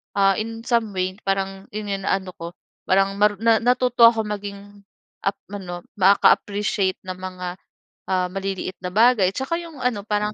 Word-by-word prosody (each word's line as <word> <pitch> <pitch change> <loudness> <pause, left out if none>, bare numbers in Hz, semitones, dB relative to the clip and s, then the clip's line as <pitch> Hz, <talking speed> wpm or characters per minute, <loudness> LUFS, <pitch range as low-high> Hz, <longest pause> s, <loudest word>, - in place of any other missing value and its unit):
ah, 195 0 +3
in 225 +1 -5
some 230 -4 0
way 185 +2 -2
parang 195 0 -2
ina 200 -2 -3
ano 190 -1 0
ko, 170 0 -9 0.3
parang 195 +1 +2
maru 210 0 +4
na 225 -1 +5
natuto 245 -1 +5
akong 225 -2 +1
maging 200 -1 -5 0.6
ap 195 0 -1 0.2
ano 180 -3 -6 0.2
maka-appreciate 200 0 +3
ng 185 0 -5
mga, 185 -1 -6 0.6
ah, 185 -1 +1
maliit 195 -1 -4
na 180 - -3
bagay. 220 -3 +5
Tsaka, 270 +5 -2
yung 330 -4 -11
ano 230 -5 -1
parang, 210 0 0
200 Hz, 155 wpm, -22 LUFS, 190-220 Hz, 0.6 s, na